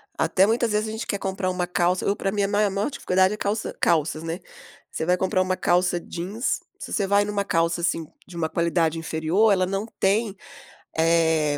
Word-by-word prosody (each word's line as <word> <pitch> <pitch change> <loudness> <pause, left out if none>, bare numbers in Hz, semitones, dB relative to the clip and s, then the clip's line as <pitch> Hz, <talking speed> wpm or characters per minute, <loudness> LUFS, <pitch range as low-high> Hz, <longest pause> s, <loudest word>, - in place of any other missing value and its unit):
Até, 190 +1 +3
muitas 230 +1 +1
vezes, 210 +1 0
a - - -4
gente 220 +1 -5
quer 200 - -1
comprar 190 -1 -2
uma 180 -1 -1
calça 180 +1 +1
eu 200 - +2
pra 195 - -2
mim, 205 0 0
a - - +2
ma 205 +1 +2
maior 200 +6 -1
dificuldade 190 -8 +1
é - - -5
calça 215 +2 -2
calças, 155 -1 +1
né. 165 +3 -4 0.5
Você - - -3
vai 180 +2 +2
comprar 185 0 +1
uma 185 0 0
calça 175 0 +2
jeans 190 +9 -3 0.2
se - - -7
você 200 -3 0
vai 200 +1 +3
numa 205 -1 -1
calça, 165 -2 0
assim, 165 -1 0 0.2
de 180 - -12
uma 160 -1 0
qualidade 165 -1 +1
inferior, 165 +7 +2
ela 185 -2 +3
não 195 +3 -3
tem, 205 +1 +1 0.6
eh, 160 -2 +2
185 Hz, 205 wpm, -24 LUFS, 170-205 Hz, 0.6 s, Até